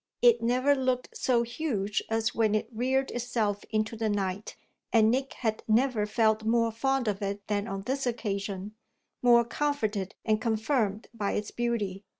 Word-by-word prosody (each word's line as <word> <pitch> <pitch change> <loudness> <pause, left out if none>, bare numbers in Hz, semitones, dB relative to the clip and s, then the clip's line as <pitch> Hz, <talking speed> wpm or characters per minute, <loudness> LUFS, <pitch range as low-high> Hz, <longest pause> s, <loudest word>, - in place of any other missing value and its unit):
It 240 -1 +6
never 255 +4 +3
looked 255 -2 -1
so 240 -2 +2
huge 230 -5 -2
as 225 0 0
when 215 -2 +2
it 215 - 0
reared 260 +4 0
itself 230 -4 -1
into 215 +1 -1
the 220 -1 -1
night, 200 0 -2 0.4
and 220 -1 +5
Nick 265 +2 -1
had 220 -3 -2
never 225 -1 +2
felt 220 0 +2
more 230 +1 +2
fond 270 +2 0
of 205 -1 -1
it 200 0 -3
than 205 -1 -1
on 195 0 -4
this 265 +3 -1
occasion, 200 -3 -3 0.5
more 235 -1 +6
comforted 225 -8 -1
and 215 -1 +2
confirmed 220 -2 0
by 210 -3 -2
its 210 - -3
beauty. 210 -5 -2
225 Hz, 160 wpm, -28 LUFS, 210-245 Hz, 0.5 s, It